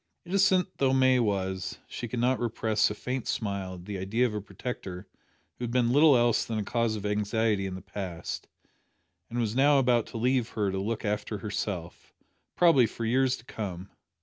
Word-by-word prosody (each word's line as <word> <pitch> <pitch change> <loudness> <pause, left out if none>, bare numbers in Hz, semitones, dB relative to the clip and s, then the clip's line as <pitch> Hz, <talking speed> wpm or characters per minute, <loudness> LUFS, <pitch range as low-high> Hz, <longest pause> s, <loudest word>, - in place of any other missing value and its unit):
Innocent 190 0 +2
though 135 -1 +3
May 130 -1 +4
was, 95 -4 -1
she 120 - -5
could 120 - -5
not 125 +2 +2
repress 110 -2 +1
a 105 - -4
faint 125 +2 -4
smile 100 -3 -2
at 90 0 -11
the 100 -1 -5
idea 110 +7 +1
of 115 - -1
a 105 - -3
protector 95 -2 -6 0.5
who - - -5
had - - -4
been 120 -1 +2
little 145 0 +6
else 120 -1 +3
than 115 - -3
a 105 - -1
cause 115 +1 0
of 105 -1 -6
anxiety 105 0 0
in 95 - -5
the 95 - -9
past, 90 -4 -6 0.8
and 120 - -5
was 115 -2 0
now 140 +2 +5
about 125 -4 +3
to - - -7
leave 125 0 +1
her 105 -3 -1
to 95 - -2
look 110 +3 -3
after 105 +1 -2
herself, 100 -4 -5 0.4
probably 165 -9 +5
for 115 +2 -5
years 130 +2 +2
to 120 - -16
come. 95 -5 -6
110 Hz, 195 wpm, -28 LUFS, 100-125 Hz, 0.8 s, little